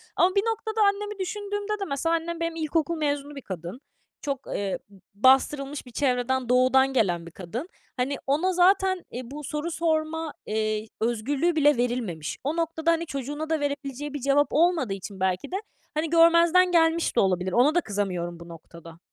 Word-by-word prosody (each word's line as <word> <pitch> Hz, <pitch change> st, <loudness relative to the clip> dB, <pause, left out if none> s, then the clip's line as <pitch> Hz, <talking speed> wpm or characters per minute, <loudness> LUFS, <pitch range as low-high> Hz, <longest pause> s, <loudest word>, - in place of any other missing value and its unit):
Ama 370 Hz, +2 st, +3 dB
bir 395 Hz, -, +4 dB
noktada 445 Hz, -1 st, -1 dB
annemi 410 Hz, 0 st, +1 dB
düşündüğümde 410 Hz, +2 st, -3 dB
de, 395 Hz, -, -2 dB
mesela, 315 Hz, +4 st, 0 dB
annem 335 Hz, 0 st, -3 dB
benim 335 Hz, 0 st, -2 dB
ilkokul 325 Hz, 0 st, -1 dB
mezunu 290 Hz, -1 st, -2 dB
bir 275 Hz, -, -7 dB
kadın. 185 Hz, -, -7 dB, 0.4 s
Çok, 275 Hz, -2 st, -4 dB
eee, 200 Hz, -2 st, -2 dB
b 200 Hz, -, -18 dB, 0.2 s
bastırılmış 270 Hz, +5 st, +2 dB
bir 250 Hz, -, -13 dB
çevreden, 255 Hz, -1 st, 0 dB
doğudan 260 Hz, +2 st, +4 dB
gelen 175 Hz, -9 st, +1 dB
bir 170 Hz, -, -10 dB
kadın. 210 Hz, -, -6 dB, 0.3 s
Hani, 255 Hz, +3 st, 0 dB
ona 320 Hz, +7 st, +2 dB
zaten, 375 Hz, +1 st, +3 dB
eee, 245 Hz, -, -5 dB
bu 295 Hz, +1 st, -7 dB
soru 300 Hz, +4 st, -3 dB
sorma, 320 Hz, -1 st, -1 dB
eee, 215 Hz, 0 st, 0 dB
i -, -, -15 dB
özgürlüğü 265 Hz, +9 st, 0 dB
bile 295 Hz, -3 st, +4 dB
verilmemiş. 235 Hz, -11 st, -2 dB
O 290 Hz, +4 st, -1 dB
noktada, 330 Hz, 0 st, 0 dB
hani, 335 Hz, 0 st, 0 dB
çocuğuna 290 Hz, +2 st, -5 dB
da 320 Hz, -1 st, +1 dB
verebileceği 285 Hz, 0 st, -4 dB
bir 290 Hz, -, -3 dB
cevap 280 Hz, +2 st, +3 dB
olmadığı 320 Hz, -, +2 dB
için 195 Hz, 0 st, -8 dB
belki 185 Hz, -, -1 dB
de, -, -, -2 dB, 0.4 s
hani, 310 Hz, +1 st, -1 dB
görmezden 335 Hz, +2 st, +5 dB
gelmiş 330 Hz, -1 st, +3 dB
de -, -, +4 dB
olabilir. 185 Hz, -1 st, +1 dB
Ona 255 Hz, -, +4 dB
da 350 Hz, -, +4 dB
kızamıyorum 180 Hz, -, -3 dB
bu 170 Hz, -, -11 dB
noktada. 165 Hz, 0 st, -12 dB
290 Hz, 180 wpm, -26 LUFS, 235-335 Hz, 0.4 s, görmezden